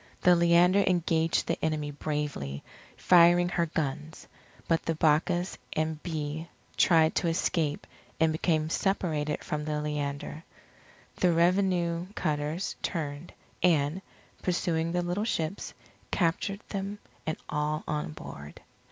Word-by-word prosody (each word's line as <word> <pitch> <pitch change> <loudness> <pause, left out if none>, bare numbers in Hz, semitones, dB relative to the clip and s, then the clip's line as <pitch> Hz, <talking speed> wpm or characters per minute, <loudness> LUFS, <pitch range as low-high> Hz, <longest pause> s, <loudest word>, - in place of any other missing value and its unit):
The 180 0 +6
Leander 170 +3 +5
engaged 165 -2 +2
the 165 - -2
enemy 155 -2 -1
bravely, 145 - -3 0.3
firing 175 0 +6
her 170 -1 0
guns; 155 0 -4 0.4
but 165 -1 +2
the 165 - -2
Bacchus 160 +4 +1
and 155 -1 -1
Bee 160 -1 -4 0.3
tried 160 -2 +4
to - - +1
escape 165 -2 0 0.3
and 160 0 +4
became 155 -1 0
separated 160 -7 0
from 150 0 -3
the 150 0 -2
Leander. 150 +1 -4 0.7
The 180 - +3
revenue 175 0 +2
cutters 155 +2 -2
turned, 150 -2 -4 0.3
and, 160 0 +2 0.4
pursuing 170 -2 0
the 175 0 0
little 175 +4 -1
ships, 175 -4 -2 0.4
captured 195 +3 0
them 200 0 -4 0.3
and 155 - -1
all 150 0 -1
on 150 - -2
board. 75 -1 -10
160 Hz, 120 wpm, -29 LUFS, 150-175 Hz, 0.7 s, The